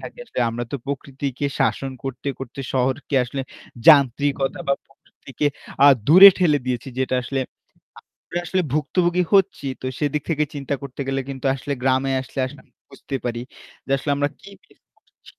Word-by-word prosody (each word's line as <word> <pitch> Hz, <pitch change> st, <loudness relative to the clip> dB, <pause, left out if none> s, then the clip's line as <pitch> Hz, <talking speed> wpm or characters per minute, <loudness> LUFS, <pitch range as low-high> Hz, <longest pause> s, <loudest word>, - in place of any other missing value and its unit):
থাকি। -, -, -10 dB
আসলে -, -, -4 dB
আমরা 120 Hz, +1 st, -4 dB
তো -, -, 0 dB
প্রকৃতিকে 140 Hz, 0 st, -4 dB
শাসন 135 Hz, -, 0 dB
করতে, 135 Hz, +1 st, -4 dB
করতে 135 Hz, +1 st, -7 dB
শহরকে 135 Hz, +2 st, -1 dB
আসলে 130 Hz, +3 st, -5 dB, 0.5 s
যান্ত্রিকতা 140 Hz, -1 st, +4 dB
বা 140 Hz, -, +4 dB
প্রকৃতিকে 135 Hz, 0 st, -6 dB, 0.4 s
আ -, -, +9 dB, 0.2 s
দূরে 185 Hz, +6 st, +11 dB
ঠেলে 160 Hz, -5 st, +3 dB
দিয়েছি। 125 Hz, 0 st, -2 dB
যেটা 130 Hz, 0 st, 0 dB
আসলে, 135 Hz, +2 st, -2 dB, 0.8 s
আমরা 175 Hz, -, -4 dB
আসলে 185 Hz, +2 st, +1 dB
ভুক্তভোগী 175 Hz, +4 st, +1 dB
হচ্ছি। 195 Hz, -7 st, +2 dB
তো -, -, -5 dB
সেদিক 150 Hz, 0 st, -1 dB
থেকে 150 Hz, -1 st, +1 dB
চিন্তা 140 Hz, 0 st, -3 dB
করতে 140 Hz, 0 st, -8 dB
গেলে 135 Hz, 0 st, 0 dB
কিন্তু 135 Hz, 0 st, -7 dB
আসলে 140 Hz, +1 st, -5 dB
গ্রামে 130 Hz, +1 st, +2 dB
আসলে, 130 Hz, -, -11 dB
আসলে 130 Hz, -, -11 dB
আমি -, -, -34 dB, 0.2 s
বুঝতে 135 Hz, -, -6 dB
পারি। 120 Hz, -1 st, -2 dB, 0.5 s
যে 135 Hz, -, -2 dB
আসলে 145 Hz, -, -3 dB
আমরা 145 Hz, 0 st, +1 dB
কি 200 Hz, -, -13 dB, 0.2 s
মিস -, -, -26 dB, 0.4 s
করছি। -, -, -58 dB
140 Hz, 170 wpm, -22 LUFS, 130-150 Hz, 0.8 s, দূরে